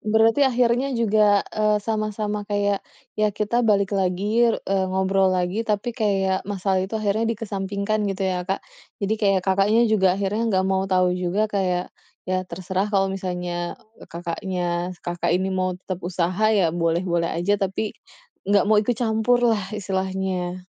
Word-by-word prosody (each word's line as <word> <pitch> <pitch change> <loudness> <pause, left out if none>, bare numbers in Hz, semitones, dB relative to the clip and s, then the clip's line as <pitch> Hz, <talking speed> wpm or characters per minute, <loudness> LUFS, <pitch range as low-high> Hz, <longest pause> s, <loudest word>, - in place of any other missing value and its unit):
Berarti 220 +4 +3
akhirnya 245 +2 +1
juga, 210 -3 +3
eee, 215 0 +2
sama-sama 215 -1 -2
kayak, 205 -1 0 0.4
ya 215 - +4
kita 210 +3 0
balik 205 -4 +2
lagi 200 +5 +2
r - - +1
eee, 190 -1 0
ngobrol 190 0 +2
lagi 185 +3 0
tapi 225 +2 -1
kayak 195 -4 0
masalah 190 -1 0
itu 190 +4 -3
akhirnya 215 +1 0
dikesampingkan 205 -1 -2
gitu 195 0 -3
ya, 185 -1 0
Kak. 195 - -2 0.4
Jadi 205 +2 0
kayak 195 -2 +3
Kakaknya 200 +5 +3
juga 190 -4 +3
akhirnya 210 +4 -1
nggak 190 -2 +2
mau 190 0 +1
tahu 185 -1 +3
juga 180 +3 0
kayak, 185 -2 -1 0.3
ya 185 0 0
terserah 190 +2 -2
kalau 195 -2 +2
misalnya, 180 -2 -4 0.2
eee, - - -13
kakaknya 175 +2 -4 0.4
Kakak 175 0 -1
ini 190 +1 -1
mau 185 -1 -1
tetep 185 0 -6
usaha 180 +3 -1
ya 195 -7 +2
boleh-boleh 170 0 0
aja, 195 +4 0
tapi 195 +2 -2 0.6
enggak 200 -1 +4
mau 215 -1 +5
ikut 230 +2 -1
campur 225 +1 +2
lah 205 -3 -1
istilahnya. 190 -2 -3
195 Hz, 155 wpm, -23 LUFS, 185-215 Hz, 0.6 s, mau